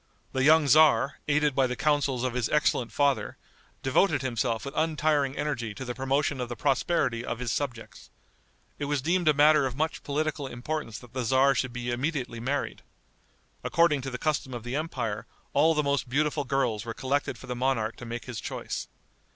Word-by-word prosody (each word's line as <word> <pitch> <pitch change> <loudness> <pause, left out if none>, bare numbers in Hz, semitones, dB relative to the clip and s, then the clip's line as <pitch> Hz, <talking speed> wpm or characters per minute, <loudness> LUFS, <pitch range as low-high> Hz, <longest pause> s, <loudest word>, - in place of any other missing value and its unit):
The 130 - 0
young 155 +2 +6
tzar, 145 0 +5
aided 150 -1 +2
by 130 0 +3
the 125 - -3
counsels 140 -3 +1
of 130 -2 -1
his 125 -2 -1
excellent 130 -6 +1
father, 135 -4 +1 0.5
devoted 140 +5 +2
himself 120 -2 -1
with 140 - -6
untiring 155 -3 +1
energy 130 -7 -2
to 130 - -6
the 125 - -3
promotion 135 +1 0
of 125 - -4
the 120 - -4
prosperity 130 -3 +1
of 115 - -3
his 125 -1 -3
subjects. 120 -4 -5 0.7
It 145 - -2
was 145 -2 -1
deemed 175 +2 +1
a 155 - +6
matter 150 -1 +5
of 130 - -6
much 160 +3 -1
political 150 -1 -2
importance 125 -2 -4
that 125 0 -14
the 130 - -2
tzar 130 +3 +4
should 130 -1 -1
be 120 0 -4
immediately 125 -2 -2
married. 135 +5 -2 0.8
According 165 -4 +3
to 135 - -4
the 125 - -4
custom 145 -4 -1
of 120 - -6
the 120 +2 -4
empire, 125 -9 -3 0.3
all 160 +3 +4
the 150 - +2
most 140 -3 0
beautiful 145 +2 0
girls 125 -6 0
were 115 -1 -6
collected 135 -1 -1
for - - -11
the 125 - -4
monarch 120 -3 0
to 120 - -9
make 120 +1 -5
his 125 -4 -6
choice. - - -5
135 Hz, 190 wpm, -27 LUFS, 120-150 Hz, 0.8 s, young